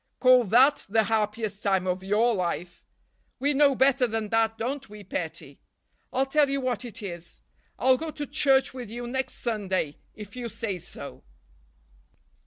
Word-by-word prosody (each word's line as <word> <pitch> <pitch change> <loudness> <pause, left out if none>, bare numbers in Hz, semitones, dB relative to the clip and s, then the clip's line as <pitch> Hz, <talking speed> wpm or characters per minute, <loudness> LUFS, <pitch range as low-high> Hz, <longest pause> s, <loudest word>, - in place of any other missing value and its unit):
Call 255 -2 +6
that 260 +8 +4
'the 220 +2 +3
happiest 215 -1 -1
time 190 -2 +1
of 185 0 -2
your 215 +5 +2
life!' 175 -2 -3 0.5
We 285 +3 +1
know 280 -1 +4
better 265 -1 +3
than 220 -2 -3
that, 225 0 +1
don't 265 +2 -4
we, 210 0 -11
petty? 195 - -5 0.5
I'll 265 - +1
tell 285 +1 +3
you 275 0 0
what 255 -3 -2
it 235 -1 -7
is: 175 -3 -8 0.4
I'll 260 0 +4
go 320 +3 -4
to 295 -1 -5
church 270 -2 +2
with 250 -4 -7
you 240 +2 -6
next 260 +1 -3
Sunday, 190 -10 -1 0.2
if 210 0 -10
you 245 -2 -4
say 215 -4 -4
so!" 65 - -8
230 Hz, 165 wpm, -26 LUFS, 205-265 Hz, 0.5 s, Call